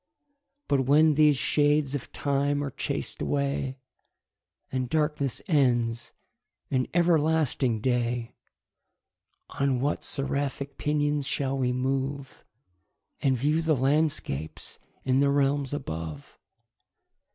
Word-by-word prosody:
But 135 Hz, -3 st, +1 dB
when 155 Hz, +2 st, +5 dB
these 150 Hz, -1 st, +4 dB
shades 145 Hz, 0 st, +2 dB
of 140 Hz, -4 st, -5 dB
time 145 Hz, 0 st, 0 dB
are 140 Hz, -, -4 dB
chas'd -, -, -4 dB
away, 140 Hz, -2 st, -1 dB, 0.9 s
And 130 Hz, -2 st, -2 dB
darkness 150 Hz, -4 st, -1 dB
ends 120 Hz, -7 st, +1 dB, 0.6 s
in 130 Hz, -2 st, +1 dB
everlasting 160 Hz, -8 st, +2 dB
day, 120 Hz, -1 st, -1 dB, 1.3 s
On 135 Hz, -2 st, +2 dB
what 140 Hz, +3 st, -1 dB
seraphic 140 Hz, 0 st, -2 dB
pinions 145 Hz, -1 st, 0 dB
shall 135 Hz, -1 st, -1 dB
we 130 Hz, -2 st, 0 dB
move, 135 Hz, +2 st, -2 dB, 0.8 s
And 130 Hz, -2 st, +2 dB
view 150 Hz, +6 st, +1 dB
the 160 Hz, -2 st, +2 dB
landscapes 135 Hz, -, -1 dB, 0.2 s
in 130 Hz, 0 st, +2 dB
the 140 Hz, 0 st, +4 dB
realms 140 Hz, -1 st, +1 dB
above? 80 Hz, -, -6 dB
140 Hz, 105 wpm, -27 LUFS, 130-145 Hz, 1.3 s, when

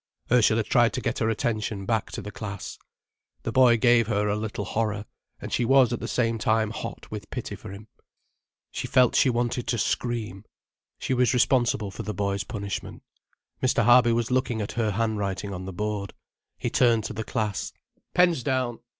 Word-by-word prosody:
Ursula 115 Hz, -2 st, +4 dB
tried 120 Hz, +1 st, +3 dB
to 130 Hz, -, -2 dB
get 115 Hz, -, -2 dB
her 110 Hz, -, +1 dB
attention 110 Hz, -2 st, -2 dB
back 110 Hz, 0 st, 0 dB
to -, -, -5 dB
the 105 Hz, -, -7 dB
class. 105 Hz, -3 st, -7 dB, 0.6 s
The -, -, -2 dB
boy 125 Hz, -3 st, +5 dB
gave 120 Hz, -1 st, +4 dB
her 105 Hz, -2 st, 0 dB
a 105 Hz, -, +1 dB
little 105 Hz, -1 st, -4 dB
horror, 105 Hz, 0 st, -2 dB, 0.3 s
and -, -, -7 dB
she -, -, +1 dB
was 130 Hz, -1 st, +4 dB
at 120 Hz, -, -2 dB
the -, -, -5 dB
same 115 Hz, -2 st, 0 dB
time 110 Hz, 0 st, +1 dB
hot -, -, -7 dB
with -, -, -7 dB
pity -, -, -5 dB
for -, -, -10 dB
him. 100 Hz, +2 st, -10 dB, 0.8 s
She -, -, -4 dB
felt 125 Hz, -2 st, +4 dB
she -, -, +4 dB
wanted 120 Hz, 0 st, -1 dB
to 125 Hz, -, 0 dB
scream. 110 Hz, -4 st, -2 dB, 0.5 s
She -, -, -2 dB
was 125 Hz, 0 st, +2 dB
responsible 120 Hz, -5 st, +2 dB
for -, -, -7 dB
the 105 Hz, -, -5 dB
boy's 100 Hz, -1 st, -1 dB
punishment. 100 Hz, -2 st, -6 dB, 0.6 s
Mr. 125 Hz, -2 st, +2 dB
Harby 120 Hz, 0 st, +6 dB
was 115 Hz, +1 st, 0 dB
looking 125 Hz, -3 st, 0 dB
at 105 Hz, -, -3 dB
her 115 Hz, -2 st, 0 dB
handwriting 100 Hz, -2 st, -2 dB
on 95 Hz, 0 st, -6 dB
the 95 Hz, -, -5 dB
board. 100 Hz, +1 st, -4 dB, 0.4 s
He -, -, -3 dB
turned 115 Hz, -3 st, +3 dB
to 110 Hz, -, -5 dB
the 110 Hz, +1 st, -4 dB
class. 105 Hz, -5 st, -2 dB, 0.4 s
"Pens 175 Hz, -6 st, +4 dB
down." 130 Hz, -2 st, -1 dB
115 Hz, 185 wpm, -26 LUFS, 105-120 Hz, 0.8 s, Harby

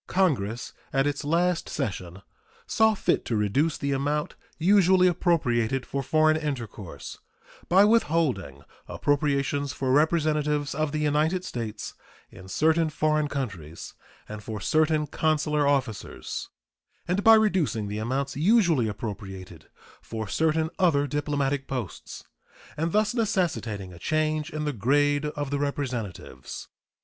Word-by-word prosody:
Congress 130 Hz, -, 0 dB, 0.2 s
at 135 Hz, 0 st, +2 dB
its 145 Hz, +1 st, -1 dB
last 170 Hz, +3 st, +1 dB
session 95 Hz, -, -4 dB, 0.4 s
saw 220 Hz, -1 st, +3 dB
fit -, -, +1 dB
to 115 Hz, -, -2 dB
reduce 120 Hz, +10 st, +1 dB
the 140 Hz, -, -2 dB
amount 145 Hz, +2 st, -1 dB, 0.2 s
usually 185 Hz, +1 st, +5 dB
appropriated 135 Hz, -9 st, +1 dB
for 140 Hz, -, -3 dB
foreign 155 Hz, +3 st, +3 dB
intercourse 120 Hz, -, -6 dB, 0.5 s
by 190 Hz, +3 st, +6 dB
withholding 155 Hz, -, +1 dB, 0.2 s
appropriations 145 Hz, -1 st, 0 dB
for 130 Hz, -1 st, -1 dB
representatives 150 Hz, -1 st, +2 dB
of 155 Hz, 0 st, -1 dB
the 155 Hz, -, -2 dB
United 155 Hz, +5 st, +1 dB
States 115 Hz, -, -5 dB, 0.4 s
in 95 Hz, -1 st, -12 dB
certain 160 Hz, -, +2 dB
foreign 155 Hz, 0 st, +1 dB
countries 95 Hz, -, -6 dB, 0.3 s
and 105 Hz, 0 st, -7 dB
for 110 Hz, -1 st, -5 dB
certain 155 Hz, +6 st, +2 dB
consular 150 Hz, -1 st, +1 dB
officers, 130 Hz, -7 st, -2 dB, 0.6 s
and 185 Hz, +3 st, 0 dB
by 225 Hz, 0 st, +9 dB
reducing 185 Hz, -, +1 dB
the 105 Hz, +1 st, -4 dB
amounts 135 Hz, +5 st, -2 dB
usually 170 Hz, -, +3 dB
appropriated 100 Hz, -3 st, -7 dB, 0.3 s
for 110 Hz, -1 st, -5 dB
certain 160 Hz, -, +1 dB
other 155 Hz, -6 st, +3 dB
diplomatic 145 Hz, -1 st, -1 dB
posts, 125 Hz, -8 st, -6 dB, 0.5 s
and 165 Hz, +2 st, -1 dB
thus 215 Hz, +2 st, +2 dB
necessitating 120 Hz, -, -1 dB
a 85 Hz, -, -12 dB
change 155 Hz, -, 0 dB
in 150 Hz, 0 st, -4 dB
the 150 Hz, -, -1 dB
grade 145 Hz, +6 st, +2 dB
of 145 Hz, -2 st, -4 dB
the 145 Hz, -, 0 dB
representatives. 130 Hz, -8 st, -4 dB
145 Hz, 125 wpm, -26 LUFS, 120-160 Hz, 0.6 s, by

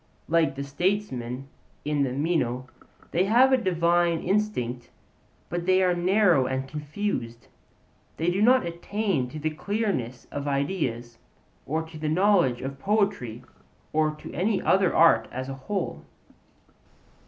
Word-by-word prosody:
Like 165 Hz, -3 st, +2 dB
the 140 Hz, -, -4 dB
Statesmen 140 Hz, -, -2 dB, 0.4 s
in 150 Hz, -1 st, 0 dB
the 135 Hz, -2 st, +1 dB
Meno, 130 Hz, -4 st, -1 dB, 0.5 s
they 180 Hz, +3 st, +2 dB
have 250 Hz, +6 st, +5 dB
a -, -, +8 dB
divine 175 Hz, -5 st, +2 dB
instinct, 125 Hz, -, -1 dB, 0.6 s
but 175 Hz, 0 st, -4 dB
they 185 Hz, 0 st, +4 dB
are 180 Hz, -1 st, +3 dB
narrow 175 Hz, -5 st, +3 dB
and 130 Hz, 0 st, -2 dB
confused; 150 Hz, -, -4 dB, 0.7 s
they 165 Hz, +2 st, +1 dB
do 190 Hz, +3 st, -1 dB
not 250 Hz, -1 st, +5 dB
attain 170 Hz, -, -2 dB
to 155 Hz, -, -8 dB
the 155 Hz, +1 st, -2 dB
clearness 170 Hz, -, -2 dB
of 145 Hz, 0 st, -4 dB
ideas, 140 Hz, -6 st, -2 dB, 0.5 s
or 160 Hz, +4 st, -1 dB
to 160 Hz, -1 st, -11 dB
the 155 Hz, 0 st, -2 dB
knowledge 175 Hz, -7 st, +3 dB
of 135 Hz, +1 st, -5 dB
poetry 195 Hz, -, 0 dB, 0.5 s
or 155 Hz, 0 st, +3 dB
of 150 Hz, 0 st, -7 dB
any 190 Hz, +5 st, +1 dB
other 190 Hz, -2 st, +3 dB
art 160 Hz, -9 st, +5 dB
as 130 Hz, +1 st, -5 dB
a -, -, -4 dB, 0.2 s
whole. 185 Hz, -, -2 dB
160 Hz, 140 wpm, -26 LUFS, 135-190 Hz, 0.7 s, a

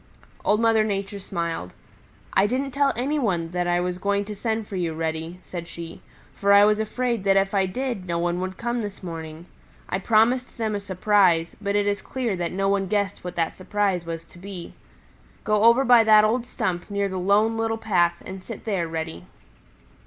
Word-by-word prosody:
Old 210 Hz, -, +2 dB
Mother 225 Hz, -1 st, +4 dB
Nature 200 Hz, -1 st, -3 dB
smiled. 170 Hz, -, -4 dB, 0.6 s
"I 195 Hz, +2 st, +4 dB
didn't 265 Hz, +4 st, -1 dB
tell 280 Hz, +1 st, +2 dB
any 280 Hz, +5 st, 0 dB
one 175 Hz, -9 st, -1 dB
that 175 Hz, 0 st, -1 dB
I 175 Hz, 0 st, +2 dB
was 180 Hz, 0 st, -2 dB
going 200 Hz, +1 st, 0 dB
to 210 Hz, 0 st, -6 dB
send 220 Hz, 0 st, -2 dB
for 200 Hz, -, -6 dB
you, 170 Hz, -3 st, -1 dB
Reddy," 160 Hz, +2 st, -3 dB
said 170 Hz, -2 st, -7 dB
she, 170 Hz, -1 st, -9 dB, 0.3 s
"for 200 Hz, 0 st, +3 dB
I 200 Hz, 0 st, +8 dB
was 210 Hz, 0 st, +3 dB
afraid 235 Hz, 0 st, -1 dB
that 195 Hz, 0 st, +4 dB
if 195 Hz, +1 st, +1 dB
I 195 Hz, -1 st, +2 dB
did 235 Hz, -2 st, -3 dB
no 170 Hz, -1 st, -1 dB
one 175 Hz, +1 st, -1 dB
would 185 Hz, 0 st, -4 dB
come 240 Hz, 0 st, -2 dB
this 205 Hz, -2 st, -7 dB
morning. 165 Hz, -1 st, -7 dB, 0.4 s
I 185 Hz, -, -1 dB
promised 235 Hz, +6 st, +2 dB
them 220 Hz, -2 st, -1 dB
a 205 Hz, -, -1 dB
surprise, 190 Hz, -3 st, +2 dB
but 200 Hz, 0 st, -1 dB
it 205 Hz, 0 st, +2 dB
is 205 Hz, 0 st, 0 dB
clear 245 Hz, -6 st, -2 dB
that 175 Hz, -1 st, -2 dB
no 195 Hz, +1 st, 0 dB
one 195 Hz, -1 st, +1 dB
guessed 200 Hz, 0 st, -1 dB
what 180 Hz, 0 st, -6 dB
that 165 Hz, -1 st, -1 dB
surprise 195 Hz, -2 st, -1 dB
was 165 Hz, 0 st, -6 dB
to 175 Hz, -, -17 dB
be. 185 Hz, -2 st, -8 dB, 0.7 s
Go 215 Hz, 0 st, +2 dB
over 235 Hz, +4 st, +6 dB
by 240 Hz, -2 st, +7 dB
that 215 Hz, -1 st, +6 dB
old 235 Hz, +3 st, 0 dB
stump 175 Hz, -4 st, -3 dB
near 200 Hz, -1 st, 0 dB
the 190 Hz, -1 st, -4 dB
Lone 205 Hz, +4 st, +3 dB
Little 225 Hz, 0 st, -1 dB
Path 175 Hz, -6 st, +1 dB
and 190 Hz, 0 st, -7 dB
sit 220 Hz, +2 st, -9 dB
there, 190 Hz, -6 st, -1 dB
Reddy." 160 Hz, -, -5 dB
200 Hz, 205 wpm, -24 LUFS, 175-220 Hz, 0.7 s, I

